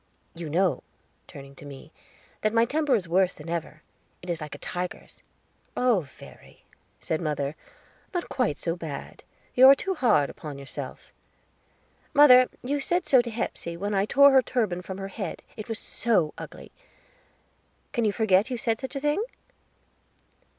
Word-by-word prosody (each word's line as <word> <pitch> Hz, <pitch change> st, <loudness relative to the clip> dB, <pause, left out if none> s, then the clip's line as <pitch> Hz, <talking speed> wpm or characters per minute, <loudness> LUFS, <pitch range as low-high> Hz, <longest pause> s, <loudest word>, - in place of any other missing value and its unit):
You 165 Hz, -2 st, -6 dB
know," 180 Hz, +3 st, +1 dB, 0.5 s
turning 140 Hz, 0 st, -11 dB
to -, -, -12 dB
me, 145 Hz, +2 st, -11 dB, 0.5 s
"that 215 Hz, +1 st, 0 dB
my 230 Hz, 0 st, +5 dB
temper 295 Hz, +1 st, +1 dB
is 190 Hz, -6 st, -2 dB
worse 180 Hz, +2 st, +2 dB
than 150 Hz, +2 st, -10 dB
ever; 165 Hz, -2 st, -5 dB, 0.4 s
it 180 Hz, -, -3 dB
is 170 Hz, -2 st, -3 dB
like 150 Hz, -1 st, -6 dB
a -, -, -9 dB
tiger's." 180 Hz, 0 st, -6 dB, 0.6 s
"Oh, 250 Hz, -5 st, +3 dB
Verry," 140 Hz, -6 st, -14 dB, 0.3 s
said 160 Hz, -, -2 dB
mother, 150 Hz, -2 st, -2 dB, 0.6 s
"not 355 Hz, -2 st, -3 dB
quite 230 Hz, -, -1 dB
so 165 Hz, -1 st, -2 dB
bad; 155 Hz, -5 st, -7 dB, 0.3 s
you 260 Hz, +1 st, +8 dB
are 275 Hz, -, +9 dB
too 385 Hz, +7 st, -2 dB
hard 225 Hz, -, +3 dB
upon 150 Hz, -3 st, -8 dB
yourself." 140 Hz, 0 st, -7 dB, 1.0 s
"Mother, 255 Hz, -3 st, +8 dB
you 285 Hz, +3 st, -1 dB
said 350 Hz, +5 st, 0 dB
so 260 Hz, -3 st, +6 dB
to 240 Hz, -, -6 dB
Hepsey, 170 Hz, -6 st, -4 dB
when 205 Hz, +3 st, -3 dB
I 195 Hz, 0 st, +2 dB
tore 280 Hz, +3 st, +7 dB
her 265 Hz, -1 st, +6 dB
turban 215 Hz, -9 st, -1 dB
from 190 Hz, +1 st, -7 dB
her 195 Hz, 0 st, -5 dB
head, 195 Hz, -2 st, -6 dB
it 215 Hz, +1 st, -8 dB
was 225 Hz, -, -2 dB
so 205 Hz, -10 st, 0 dB
ugly. -, -, -10 dB, 1.2 s
Can 240 Hz, -4 st, 0 dB
you 215 Hz, -, +3 dB
forget 205 Hz, +1 st, +2 dB
you 250 Hz, -, -2 dB
said 225 Hz, -1 st, 0 dB
such 265 Hz, +1 st, -6 dB
a -, -, -1 dB
thing?" 295 Hz, +8 st, 0 dB
205 Hz, 165 wpm, -26 LUFS, 165-250 Hz, 1.2 s, are